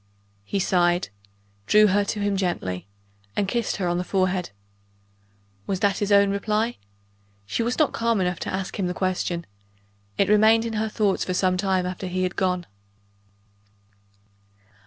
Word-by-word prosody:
He 150 - -3
sighed 180 -2 +2 0.6
drew 210 - +6
her 205 0 +3
to 205 - -3
him 205 -1 0
gently 95 - -2 0.5
and 200 - 0
kissed 235 +2 -1
her 185 -2 -2
on 175 0 0
the - - -1
forehead. 185 -1 0 1.2
Was 190 -2 -2
that 200 -1 +2
his 205 0 -1
own 200 0 +5
reply? 215 +3 -1 0.7
She 105 - -2
was 235 +2 -1
not 305 -3 +2
calm 230 -2 +1
enough 180 -2 -1
to - - -4
ask 190 +1 -4
him 185 - 0
the 180 - -3
question: 180 -2 -1 0.7
it 195 - +3
remained 220 +2 +5
in 230 - -3
her 220 0 -1
thoughts 210 -3 +1
for 185 - -2
some 185 0 +2
time 190 -1 0
after 185 +1 -4
he 185 +1 -1
had 185 0 -2
gone. 180 -2 0
195 Hz, 160 wpm, -24 LUFS, 180-210 Hz, 1.2 s, drew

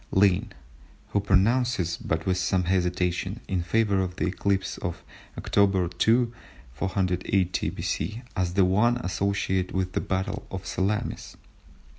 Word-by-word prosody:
Lynn, 100 +2 +3 0.6
who 100 - +1
pronounces, 100 -1 +2
but 80 0 -2
with 95 -1 +1
some 90 0 +1
hesitation, 90 +2 0
in 95 -3 0
favour 100 +2 +2
of 90 -1 -2
the - - -1
eclipse 95 +1 -1
of 85 -4 -4 0.3
October 95 -3 +2
2, 115 +7 +2 0.4
480 95 +2 0
B.C., 110 +4 -3
as 90 -3 -1
the 95 -2 +5
one 105 +6 +3
associated 95 -2 -1
with 95 -1 0
the - - -1
battle 100 +1 -3
of 95 0 -6
Salamis. 100 +3 -2
95 Hz, 130 wpm, -26 LUFS, 90-100 Hz, 0.6 s, the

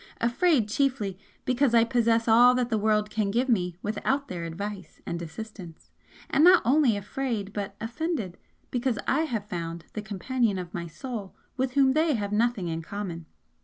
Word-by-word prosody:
Afraid, 240 - +2
chiefly, 220 -4 0 0.3
because 255 -1 +2
I 230 - +7
possess 230 -1 +2
all 240 +3 +7
that 250 -1 0
the 220 - +2
world 210 0 +1
can 210 -2 0
give 240 +6 +1
me 180 -8 +1
without 270 +6 -1
their 175 -2 -4
advice 195 +3 -6
and 170 0 -4
assistance 175 -1 -9 0.4
and 290 - +3
not 360 0 +7
only 255 -4 +4
afraid, 205 -1 -3
but 200 -1 -4
offended, 235 - -3 0.3
because 245 -2 0
I 310 +4 +2
have 225 -8 -3
found 170 -4 -5
the 215 - -4
Companion 215 +1 -1
of 180 -2 -6
my 170 0 -4
Soul 200 +4 -7 0.2
with 260 -1 -1
whom 270 -1 +4
they 310 -1 +2
have 205 -2 -3
nothing 220 -3 +1
in 165 0 -3
common. 170 -2 -6
220 Hz, 170 wpm, -27 LUFS, 195-255 Hz, 0.4 s, I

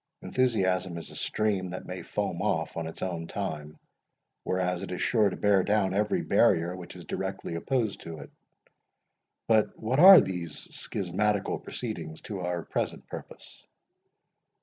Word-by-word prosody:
Enthusiasm 95 -8 +1
is 85 - -8
a - - -11
stream 100 -4 0
that 90 +1 -6
may 90 0 -5
foam - - -3
off - - -1
in 85 -1 -3
its 80 - -7
own 85 -3 -3
time, 75 -7 -5 0.7
whereas 90 -1 -1
it - - -6
is 90 - -4
sure 110 -4 +3
to - - -5
bear 100 -2 +4
down 100 -2 +1
every 105 +1 +1
barrier 85 +2 +3
which 90 -2 -9
is - - -10
directly - - -4
opposed 110 +4 -1
to 80 -1 -7 1.3
it.—But 110 -2 +2
what 125 +5 0
are 190 +1 +11
these 85 - -3
schismatical 100 +2 -1
proceedings 80 0 -5
to 100 -3 -6
our 90 -1 -2
present - - -3
purpose?" - - -10
95 Hz, 150 wpm, -28 LUFS, 85-105 Hz, 1.3 s, are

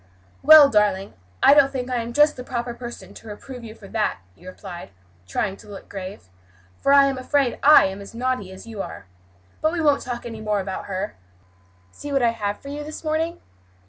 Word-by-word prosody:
"Well, 310 -1 +9
darling, 205 -3 +1 0.3
I - - +8
don't 285 -2 +5
think 250 -2 -4
I 250 - 0
am 235 0 -3
just 295 +4 +4
the 250 - -7
proper 240 -1 -4
person 240 0 -9
to 225 - -13
reprove 245 +4 -9
you 220 -1 -9
for 205 - -14
that," 220 -2 -1 0.2
he 180 - -17
replied, 185 - -9 0.4
trying 195 - -2
to 210 - -16
look 200 - -11
grave, 195 0 -7 0.6
"for 275 - +2
I 280 0 +7
am 270 -1 -1
afraid 270 -1 0
I 300 +2 +7
am 190 +1 -4
as 200 +3 -11
naughty 250 -5 -2
as 190 +3 -11
you 225 -3 -6
are. - - -8 0.6
But 315 +1 +1
we 345 - -2
won't 295 -3 +3
talk 245 -1 -6
any 225 -2 -7
more 210 -1 0
about 190 -1 -5
her. 195 - -4 0.7
See 290 - -8
what 275 -2 +1
I 235 - +5
have 205 -3 -3
for 280 - -10
you 295 +1 -5
this 305 +2 -8
morning." 320 +2 -2
235 Hz, 210 wpm, -23 LUFS, 205-280 Hz, 0.7 s, Well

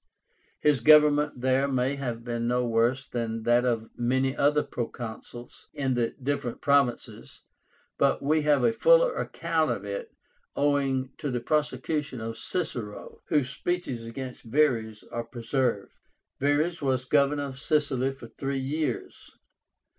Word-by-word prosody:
His 150 -3 +3
government 150 0 +5
there 130 +2 +2
may 130 0 0
have 120 -5 -4
been 120 -1 -2
no 125 0 +1
worse 120 +3 +1
than 115 -2 -3
that 120 +2 +3
of 115 -2 0
many 130 +3 0
other 150 +1 +3
proconsuls 120 0 -7
in 135 -2 0
the 120 -2 -1
different 135 -3 -2
provinces, 140 -4 0 0.6
but - - +3
we 155 +3 +2
have 150 -1 +3
a 230 - +3
fuller - - +5
account - - -1
of - - -3
it - - -5 0.5
owing 135 -2 +1
to 150 -3 -3
the 125 -2 -1
prosecution 150 0 -1
of 115 0 -5
Cicero, 120 - -4
whose 145 -5 +1
speeches 140 -6 -3
against 125 +2 -7
Verres 115 -5 +1
are 120 - -3
preserved. 120 -2 -2 0.4
Verres 150 +5 +1
was 130 -2 0
Governor 145 +1 +2
of 135 -2 -6
Sicily 140 -3 +1
for 130 -4 -12
three 135 +4 -3
years. 135 0 -4
130 Hz, 140 wpm, -27 LUFS, 120-145 Hz, 0.6 s, government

